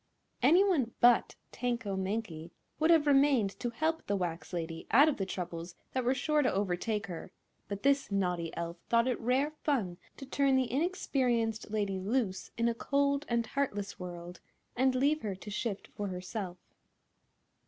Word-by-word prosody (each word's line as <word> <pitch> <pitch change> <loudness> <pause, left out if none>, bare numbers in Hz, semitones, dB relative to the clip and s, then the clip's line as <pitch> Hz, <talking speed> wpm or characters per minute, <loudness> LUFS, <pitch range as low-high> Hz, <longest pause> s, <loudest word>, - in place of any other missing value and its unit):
Anyone 315 - +4
but 240 0 +5 0.2
Tanko 235 -5 -2
Mankie 190 -4 -3 0.3
would 315 +1 +3
have 325 -3 +6
remained 275 -7 +4
to 240 - -1
help 320 +7 -1
the 205 - +1
wax 175 -3 -3
lady 165 -2 -4
out 275 +8 +7
of 305 - +1
the 195 - -2
troubles 175 -2 -5 0.2
that 255 - -1
were 255 +2 +2
sure 300 +3 +2
to 255 - +2
overtake 205 +3 -1
her; 180 -1 -7 0.4
but 200 -1 -5
this 280 0 +3
naughty 180 -4 0
elf 170 0 -4
thought 235 +1 +4
it 250 - 0
rare 260 +5 +1
fun 240 - -2 0.2
to 270 - -8
turn 275 0 +2
the 260 -2 +1
inexperienced 250 - 0
lady 200 -3 -1
loose 200 -1 -1
in 230 0 +2
a 235 - +2
cold 280 +4 0
and 235 -1 +1
heartless 205 -7 -2
world 175 -1 -7 0.4
and 260 +1 +3
leave 285 +4 +2
her 205 -3 -3
to 210 +3 -9
shift 210 -1 -3
for 205 - -3
herself. 185 0 -5
230 Hz, 165 wpm, -31 LUFS, 190-270 Hz, 0.4 s, out